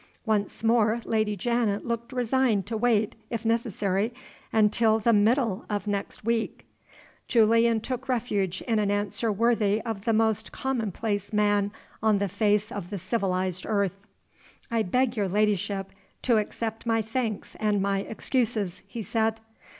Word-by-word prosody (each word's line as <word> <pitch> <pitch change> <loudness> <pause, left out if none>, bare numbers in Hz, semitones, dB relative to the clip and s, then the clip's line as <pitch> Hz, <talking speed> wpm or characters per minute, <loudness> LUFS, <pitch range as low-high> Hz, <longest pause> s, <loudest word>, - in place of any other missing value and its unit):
Once 215 -1 -1
more 225 0 +3
Lady 215 -2 +1
Janet 220 0 0
looked 235 +1 -3
resigned 250 -4 +1
to 225 +2 -4
wait 220 -1 +2
(if 230 -1 -4
necessary) 220 -2 0 0.4
until 220 +1 +4
the 230 +1 +2
middle 220 0 +2
of 205 -1 -2
next 205 0 -3
week. 230 -1 -1 0.6
Julian 230 0 +4
took 255 +3 -5
refuge 205 -7 -1
in 225 -3 +1
an 205 -1 +1
answer 205 +2 0
worthy 220 -1 +2
of 220 -4 -5
the 230 - +3
most 220 0 +1
commonplace 220 -5 -2
man 205 -1 +2 0.3
on 215 -1 +3
the 200 0 0
face 205 +2 +1
of 200 -8 -5
the 205 - -4
civilized 185 -2 -1
earth. 200 -2 0 0.7
"I 230 -1 +2
beg 250 +5 +1
your 205 -2 +1
ladyship 200 -1 0 0.3
to 235 -3 +4
accept 225 +2 -3
my 225 -1 +2
thanks 225 -1 -3
and 210 -2 +1
my 195 0 +1
excuses," 215 -3 -1
he 225 +2 -6
said. 225 +1 0
215 Hz, 145 wpm, -27 LUFS, 205-230 Hz, 0.7 s, until